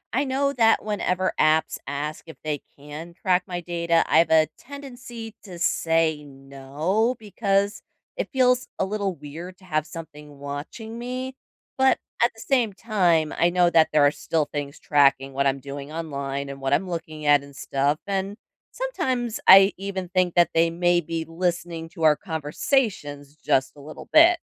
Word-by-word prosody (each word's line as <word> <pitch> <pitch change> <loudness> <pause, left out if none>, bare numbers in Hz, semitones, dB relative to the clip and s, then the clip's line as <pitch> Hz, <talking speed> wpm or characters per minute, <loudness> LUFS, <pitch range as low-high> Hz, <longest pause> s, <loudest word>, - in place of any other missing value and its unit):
I 275 +3 +2
know 275 +1 0
that 225 -3 +3
whenever 185 -3 -1
apps 155 +1 +3
ask 145 +2 -4
if 160 - -10
they 150 -2 -3 0.2
can 150 +4 -9
track 185 0 +1
my 175 -1 -4
data, 170 -1 +1
I've 165 +2 +4
a 160 -1 +5
tendency 245 -5 -9
to 185 -4 -10
say 165 -2 +1
"no" 140 - -2
because 200 -1 -1 0.3
it - - -3
feels 250 -2 +2
a 190 - 0
little 200 -2 -2
weird 165 +5 -9
to 185 - -19
have 155 -3 -1
something 150 -3 -10
watching 145 - -7
me, 255 +2 -5 0.4
but, 265 0 +4 0.3
at 240 - +4
the 225 - -18
same 245 -3 +1
time, 180 -7 +1
I 170 - +4
know 175 0 +3
that 160 -2 +4
there 150 -1 +5
are 145 - +5
still 155 0 -1
things 145 0 -6
tracking 140 -2 +3
what 140 +1 0
I'm 135 0 +1
doing 140 +1 -8
online 140 -4 -4
and 140 0 -8
what 135 - -1
I'm 190 - +2
looking 155 -3 -6
at 145 -1 +5
and 140 0 -14
stuff, 140 +1 0
and 195 +1 -2 0.3
sometimes 260 - -2
I 195 +1 +9
even 190 -1 -4
think 180 -1 +1
that 175 -1 +4
they 165 0 +3
may 175 +1 +2
be 165 0 -4
listening 170 -1 -3
to 165 -2 -8
our 155 -1 +6
conversations 150 - -2
just 135 -2 0
a 145 - -13
little 155 +2 -10
bit. 335 +2 +7
170 Hz, 170 wpm, -24 LUFS, 150-205 Hz, 0.4 s, I